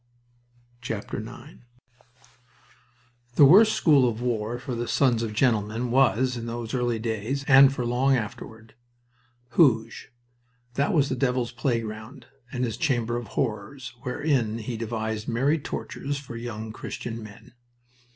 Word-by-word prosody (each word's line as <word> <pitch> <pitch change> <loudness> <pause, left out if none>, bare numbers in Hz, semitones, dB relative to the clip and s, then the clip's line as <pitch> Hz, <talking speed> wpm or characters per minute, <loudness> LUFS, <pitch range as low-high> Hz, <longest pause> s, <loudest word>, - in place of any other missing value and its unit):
IX 110 -4 -4 2.3
The 145 - +8
worst 210 +9 +7
school 140 -6 +4
of 110 -1 -5
war 120 -1 -2
for 130 +1 -6
the 120 0 -3
sons 125 -5 +2
of 115 -2 -2
gentlemen 110 0 0
was, 130 0 +3
in 115 -1 -5
those 115 -1 -5
early 120 -2 0
days, 115 +4 -3
and 135 -1 +8
for 125 -3 -3
long 130 +3 +2
afterward, 110 0 -7 0.8
Hooge. 120 -2 +2 0.6
That 140 +3 +1
was 145 -3 +3
the 130 - -1
devil's 125 -2 0
playground 115 0 -3 0.3
and 125 - -2
his 115 -3 -2
chamber 120 -6 0
of 120 -2 -4
horrors, 120 +2 -3
wherein 125 -4 0
he 115 +1 -5
devised 110 -1 -3
merry 135 +7 +1
tortures 145 0 -5
for 135 -4 -9
young 110 -2 -6
Christian 115 0 -6
men. 110 +1 -13
120 Hz, 130 wpm, -26 LUFS, 110-135 Hz, 2.3 s, The